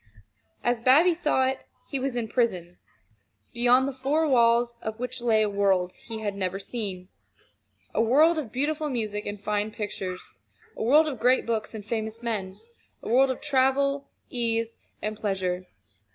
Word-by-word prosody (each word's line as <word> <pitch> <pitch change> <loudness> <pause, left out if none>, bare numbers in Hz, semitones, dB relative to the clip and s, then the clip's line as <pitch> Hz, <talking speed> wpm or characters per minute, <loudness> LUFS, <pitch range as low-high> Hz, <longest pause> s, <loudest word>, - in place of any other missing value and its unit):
As 240 -1 +1
Bobby 290 +9 +5
saw 300 -6 +1
it, 265 +1 -2 0.3
he 275 - -1
was 265 -1 -2
in 235 -2 -1
prison, 185 -8 -1 0.7
beyond 245 +2 +4
the 275 - -3
four 280 +5 +1
walls 235 -2 +3
of 220 0 -5
which 250 0 -4
lay 220 -2 +3
a - - +1
world 195 -3 +1
he 225 -1 -8
had 205 -2 -2
never 190 -1 -2
seen 195 -3 -6 0.8
a - - +2
world 305 +8 +4
of 250 -8 -6
beautiful 300 +4 -1
music 215 -5 -3
and 205 0 -5
fine 210 +1 -1
pictures; 195 -4 -6 0.4
a - - -7
world 295 +8 +5
of 270 -6 -4
great 250 +3 +3
books 225 -1 -2
and 210 -2 -7
famous 220 +1 -4
men; 200 -5 -3 0.5
a - - -5
world 265 +3 +5
of 260 - -3
travel, 275 0 +1 0.2
ease, 230 -1 -1 0.3
and 215 0 -3
pleasure. 185 -3 -2
230 Hz, 165 wpm, -26 LUFS, 210-260 Hz, 0.8 s, Bobby